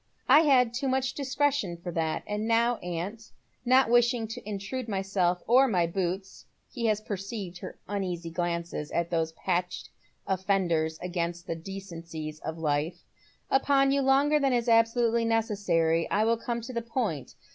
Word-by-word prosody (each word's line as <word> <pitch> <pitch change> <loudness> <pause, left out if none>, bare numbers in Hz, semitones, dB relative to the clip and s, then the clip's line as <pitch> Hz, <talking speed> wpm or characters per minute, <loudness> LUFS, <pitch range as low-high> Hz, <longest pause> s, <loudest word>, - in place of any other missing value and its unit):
"I - - +8
had 260 -6 +4
too 260 +3 -2
much 260 0 0
discretion 275 -9 0
for 175 +1 -6
that. 160 -1 -1
And 210 +1 -3
now, 235 +1 +3
aunt, 180 +6 -5 0.3
not 255 +1 +5
wishing 240 -1 +3
to 220 -2 -7
intrude 215 +5 -4
myself 190 -3 0
or 255 +4 +5
my 180 -7 +2
boots 185 +2 -3 0.3
(he 235 -2 -2
has 215 -1 +2
perceived 195 -3 -5
her - - -8
uneasy 180 -4 -3
glances 170 -3 -3
at 170 0 -1
those 160 -1 0
patched 180 +1 -2 0.4
ofEenders 180 -5 0
against 175 -1 -3
the - - -2
decencies 165 -4 -7
of 160 +1 -5
life) 150 +1 -1 0.5
upon 275 0 +3
you 280 0 +2
longer 280 +3 +4
than 275 -2 +2
is 240 -1 0
absolutely 230 0 +3
necessary, 200 -8 +1
I 210 - +2
will 230 +1 +3
come 235 +1 -3
to 235 +3 -8
the 235 - -1
point. 225 - -3
200 Hz, 155 wpm, -28 LUFS, 170-240 Hz, 0.5 s, I